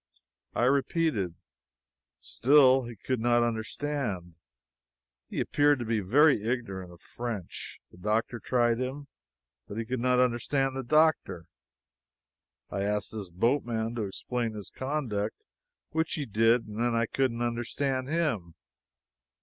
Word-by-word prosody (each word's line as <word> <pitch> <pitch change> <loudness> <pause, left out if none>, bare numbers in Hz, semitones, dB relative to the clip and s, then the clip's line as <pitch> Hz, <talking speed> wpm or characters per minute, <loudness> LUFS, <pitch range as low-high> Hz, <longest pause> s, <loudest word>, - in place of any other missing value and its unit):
I - - +1
repeated. 135 - +1 0.8
Still 130 -1 +5
he 120 0 -8
could 125 +4 -2
not 120 +1 +3
understand. 110 - -3 1.0
He - - -4
appeared 145 0 +3
to 120 - -4
be 110 -1 +1
very 135 +6 +4
ignorant 110 -7 -3
of 85 - -16
French. 115 -6 -6
The 85 - -16
doctor 110 +4 0
tried 120 -1 +1
him, 135 +2 -4 0.6
but 100 - -7
he 115 - -2
could 125 +2 -2
not 125 +1 +2
understand 125 +2 +1
the 135 - -2
doctor. 135 - +2 1.3
I 100 - -2
asked 105 +1 -1
this 105 -4 -6
boatman 115 +3 0
to 115 -3 -2
explain 115 +3 -3
his 105 -2 -7
conduct, 130 -7 -3 0.5
which 160 0 0
he 150 - -3
did; 115 +1 +3
and 105 +1 -7
then 120 0 +1
I 115 0 +2
couldn't 120 0 0
understand 130 +3 -1
him. 135 - -1
120 Hz, 135 wpm, -29 LUFS, 110-135 Hz, 1.3 s, Still